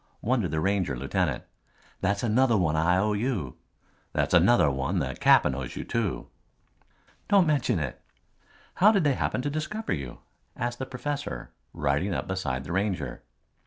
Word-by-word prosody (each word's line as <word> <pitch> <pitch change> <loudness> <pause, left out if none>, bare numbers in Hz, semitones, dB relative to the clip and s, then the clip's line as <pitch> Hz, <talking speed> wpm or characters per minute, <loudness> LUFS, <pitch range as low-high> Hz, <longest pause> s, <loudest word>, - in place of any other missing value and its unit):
wondered 115 -6 +1
the 80 - -1
Ranger 90 -7 0
lieutenant. 70 +3 -1 0.6
"That's 100 +2 0
another 120 +1 +3
one 80 -5 +1
I 85 +3 +3
owe 105 +2 +1
you. 105 - -2 0.6
That's - - 0
another 90 -2 +5
one 65 0 -1
the - - -1
Cap'n - - +4
owes 65 -2 -5
you - - -4
too." 115 -7 -2 1.0
"Don't 195 -3 +5
mention 150 - +1
it." 75 -6 -4 0.7
"How 205 +4 +6
did 200 -5 +2
they 145 -2 +3
happen 125 - -1
to 145 - -1
discover 185 +9 -3
you?" 70 -6 -6 0.4
asked 120 0 -3
the 130 - -4
professor 135 - -5 0.2
riding 75 +6 0
up - - -3
beside 70 -9 -2
the 80 - -7
Ranger. 95 +1 -2
100 Hz, 160 wpm, -27 LUFS, 75-130 Hz, 1.0 s, How